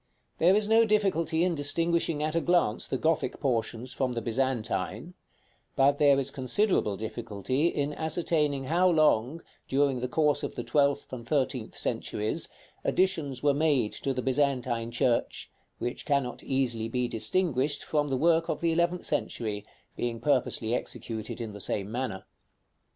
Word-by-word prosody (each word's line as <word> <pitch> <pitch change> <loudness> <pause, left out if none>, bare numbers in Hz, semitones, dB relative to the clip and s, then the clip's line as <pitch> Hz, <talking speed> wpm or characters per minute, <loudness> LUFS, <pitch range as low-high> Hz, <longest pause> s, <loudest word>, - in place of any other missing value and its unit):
There 180 +4 +5
is 210 0 +2
no 225 +1 +5
difficulty 180 -7 +1
in 180 -1 +2
distinguishing 165 +1 0
at 155 0 -1
a 165 - +1
glance 175 -12 +2
the 130 - -1
Gothic 160 +4 0
portions 120 -1 -1
from 130 -2 -1
the 115 - -3
Byzantine; 120 -1 -2 0.6
but 140 +1 +3
there 140 -2 +5
is 135 0 -2
considerable 130 - +1
difficulty 115 - -2
in 145 -3 -1
ascertaining 155 -3 0
how 175 +7 +3
long, 155 -2 +2 0.2
during 135 -1 +1
the 125 - -2
course 150 +1 +1
of - - -4
the - - -4
twelfth 140 -2 +1
and 120 -2 -7
thirteenth 130 -5 -1
centuries, 105 +1 -1 0.3
additions 160 -9 0
were 145 -1 +4
made 145 -7 +2
to 135 - -3
the 125 -1 -2
Byzantine 130 -4 0
church, 120 0 0 0.3
which 120 - -4
cannot 140 -4 0
be - - -10
easily 125 -2 0
distinguished 140 - 0
from 150 -1 0
the 135 - 0
work 165 +3 +3
of - - -1
the 170 -1 +1
eleventh 170 +2 0
century, 105 -8 -3 0.3
being 120 -1 -3
purposely 120 -3 0
executed 110 -2 -4
in 115 -3 -5
the 100 - -9
same 100 +2 -2
manner. 120 -5 -3
140 Hz, 155 wpm, -28 LUFS, 120-160 Hz, 0.6 s, There